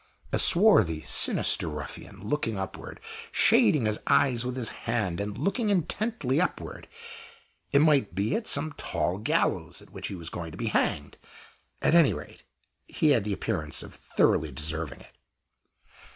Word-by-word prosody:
A - - +1
swarthy, 110 - +5
sinister - - +2
ruffian, 75 +6 -8
looking 115 -5 -1
upward, 95 -1 -7 0.3
shading 140 -7 +4
his 105 0 0
eyes 125 -4 +3
with 125 0 -4
his 125 -4 -3 0.2
hand, 105 -7 -1
and 100 +1 -4
looking 200 - -1
intently 180 - 0
upward 180 - -4 0.8
it 140 - +4
might 140 - +2
be 100 +3 0
at 225 - -3
some 155 -1 +1
tall 85 +4 -2
gallows 105 - -1
at - - -18
which - - -6
he 100 - -6
was 85 -2 -7
going 85 -2 -6
to - - -10
be 115 0 -2
hanged. - - -1 0.6
At - - +3
any 170 -5 +5
rate, - - -10 0.5
he 155 - +1
had 115 -7 +2
the 105 - -1
appearance 80 -8 -3
of - - -11
thoroughly 80 -1 0
deserving 75 +1 -4
it. - - -18
110 Hz, 155 wpm, -27 LUFS, -, 0.8 s, swarthy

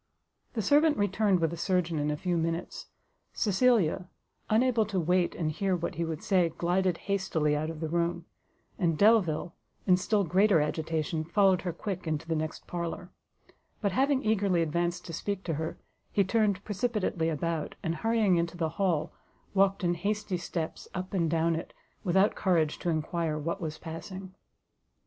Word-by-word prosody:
The 220 - -1
servant 295 - +4
returned 205 -1 +2
with 165 0 +1
a - - -5
surgeon 175 -3 0
in 145 +1 0
a 150 - -1
few 180 +2 -1
minutes: 165 +1 -2 0.5
Cecilia, 195 -5 +2 0.4
unable 235 +1 +3
to 195 -3 -1
wait 180 +1 +1
and 155 -2 -1
hear 190 +4 0
what 170 - -3
he 170 - -2
would 160 -2 -4
say, 180 -4 +3
glided 175 +2 0
hastily 185 -7 +1
out 155 +1 -1
of 165 -1 -6
the 160 - -1
room; 170 +1 -1 0.5
and 165 -5 +1
Delvile, 180 -5 +3 0.3
in 180 -2 +5
still 205 +2 +1
greater 185 +1 +4
agitation, 155 +1 -1
followed 190 +2 +3
her 180 - -2
quick 185 +1 -5
into 160 +1 -2
the 165 - 0
next 155 0 -4
parlour; 175 +1 -5 0.7
but 200 -3 0
having 270 +5 +2
eagerly 200 -5 +2
advanced 170 +2 -1
to 165 - -7
speak 195 +3 -3
to 165 - -2
her, 160 +2 -3 0.3
he 200 - +3
turned 200 -1 +1
precipitately 205 -6 -1
about, 165 0 -2
and 165 0 -1
hurrying 220 -3 +2
into 170 +1 -1
the 165 -2 0
hall, 180 -6 +1 0.4
walked 195 0 +3
in 175 0 +2
hasty 200 +1 -2
steps 170 -2 -4
up 185 +1 -4
and 170 -4 +1
down 165 +1 +2
it, 160 - -6 0.3
without 190 +2 +3
courage 165 -5 +1
to 175 - -2
enquire 160 0 -1
what 170 +6 -3
was 155 -2 -4
passing. 185 +3 -8
175 Hz, 170 wpm, -29 LUFS, 165-200 Hz, 0.7 s, in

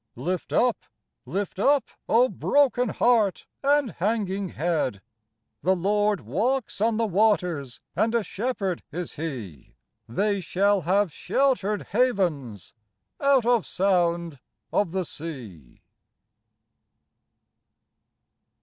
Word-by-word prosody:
Lift 175 +8 -3
up, 245 -1 +3 0.5
lift 190 +6 -3
up, 280 +5 +2 0.2
O 240 +3 +5
broken 260 -3 +2
heart 220 -6 +2 0.2
and 285 -3 +3
hanging 200 0 -1
head! 150 - -2 0.6
The 190 +2 +2
Lord 205 +1 +1
walks 210 - -1
on 225 0 +2
the 230 - +1
waters 180 - +1 0.2
and 225 +1 +1
a 230 - +2
Shepherd 195 -3 -3
is 175 +2 -5
He 120 - -7 0.3
They 200 - 0
shall 200 +3 +2
have 185 +1 +1
sheltered 225 - 0
havens 175 - 0 0.5
out 275 -4 +3
of 240 -4 +3
sound 170 -5 0 0.3
of 200 -5 +1
the 185 0 -1
sea. 120 - -9
195 Hz, 105 wpm, -25 LUFS, 165-225 Hz, 0.6 s, O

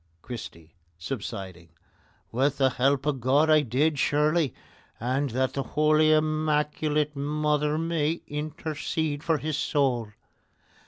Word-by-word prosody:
CHRISTY 85 -9 -9 0.2
(subsiding): 95 -3 -6 0.6
With 135 +4 +1
the 135 -1 +3
help 135 +2 +1
of 140 -4 -1
God 145 +6 +3
I 155 -1 +6
did 145 +4 +1
surely, 150 0 +2 0.5
and 130 +4 0
that 130 +2 0
the 140 - -1
Holy 155 +2 +3
Immaculate 150 -1 +1
Mother 150 +1 0
may 165 -1 -1
intercede 155 0 -3
for 165 -2 +2
his 150 0 -3
soul. 130 -8 0
145 Hz, 115 wpm, -26 LUFS, 130-155 Hz, 0.6 s, I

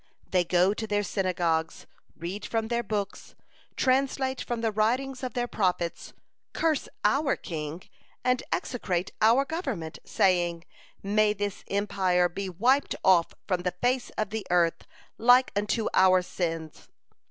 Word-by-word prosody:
They 180 -1 +3
go 180 +3 +3
to 220 +1 -5
their 205 -1 0
synagogues, 175 -4 -1 0.3
read 180 +5 -5
from 225 -1 -2
their 235 0 +1
books, 205 -2 -4 0.4
translate 265 0 +1
from 240 -1 -3
the 225 -1 +1
writings 250 +5 0
of 255 -2 -5
their 245 0 0
Prophets, 180 -6 -1 0.4
curse 315 -4 0
our 275 0 +2
king, 160 0 -6 0.4
and 250 0 +2
execrate 185 -7 -2
our 235 +6 +5
government, 270 - -4
saying: 175 -3 +1 0.4
'May 210 +1 +3
this 205 -1 -4
empire 190 -3 +1
be 195 +2 -4
wiped 245 +10 +2
off 180 -3 +4
from 185 -3 0
the 180 0 -2
face 250 0 +1
of 215 -2 -1
the 220 -1 -3
earth 170 -1 +1 0.3
like 245 +3 +5
unto 210 +2 0
our 185 -1 +5
sins.' 165 -3 -4
205 Hz, 140 wpm, -27 LUFS, 180-245 Hz, 0.4 s, our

